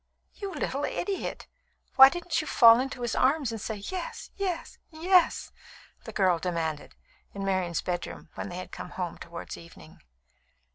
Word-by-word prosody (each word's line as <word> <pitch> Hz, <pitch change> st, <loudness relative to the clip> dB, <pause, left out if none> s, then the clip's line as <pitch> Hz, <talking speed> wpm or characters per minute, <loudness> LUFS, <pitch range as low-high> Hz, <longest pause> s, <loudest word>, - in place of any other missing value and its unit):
"You 400 Hz, -2 st, -6 dB
little 280 Hz, -5 st, -2 dB
idiot! 395 Hz, +5 st, -3 dB, 0.5 s
Why 265 Hz, 0 st, +11 dB
didn't 345 Hz, 0 st, -2 dB
you 310 Hz, -, -8 dB
fall 230 Hz, -4 st, +7 dB
into 260 Hz, -1 st, -3 dB
his 240 Hz, -, -1 dB
arms 270 Hz, -1 st, +2 dB
and 225 Hz, -2 st, -5 dB
say 220 Hz, -, -3 dB
'Yes 375 Hz, -, -6 dB
yes 375 Hz, -4 st, -3 dB
yes'?" 350 Hz, +2 st, +2 dB, 0.5 s
the -, -, -6 dB
girl 185 Hz, -4 st, +2 dB
demanded, 160 Hz, -4 st, -3 dB, 0.4 s
in 195 Hz, 0 st, -3 dB
Marian's 185 Hz, -3 st, 0 dB
bedroom, 175 Hz, -2 st, -4 dB
when -, -, -5 dB
they 175 Hz, -, -6 dB
had 185 Hz, -, -7 dB
come -, -, -7 dB
home 180 Hz, -2 st, -5 dB
towards 170 Hz, 0 st, -8 dB
evening. 80 Hz, -, -14 dB
230 Hz, 155 wpm, -28 LUFS, -, 0.5 s, Why